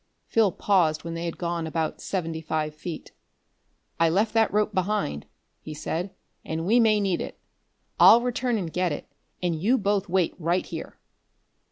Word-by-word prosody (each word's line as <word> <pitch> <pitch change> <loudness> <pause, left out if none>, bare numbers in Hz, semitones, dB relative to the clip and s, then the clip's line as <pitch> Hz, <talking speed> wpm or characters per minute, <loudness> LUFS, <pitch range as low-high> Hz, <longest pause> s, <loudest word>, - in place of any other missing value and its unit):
Phil 220 -4 +3
paused 170 -7 +2
when 165 - -5
they 165 +1 -4
had 170 - -4
gone 170 -2 -2
about 160 0 -2
seventy 165 -4 -3
five 155 -1 -2
feet. 155 +1 -7 0.9
"I 165 0 +4
left 205 +6 +1
that 225 -1 +3
rope 210 +1 +1
behind," 185 - -1 0.3
he 155 - -8
said, 165 +5 -3 0.3
"and 160 +1 -3
we 230 +6 +4
may 220 -2 +4
need 195 -4 0
it. - - -6 0.6
I'll 235 - +8
return 245 -1 0
and 175 -6 -4
get 180 -1 +1
it, 145 - -5 0.4
and 175 -2 +1
you 240 +8 +3
both 200 -2 0
wait 180 -2 +1
right 170 +2 0
here." - - -7
180 Hz, 170 wpm, -26 LUFS, 160-210 Hz, 0.9 s, I'll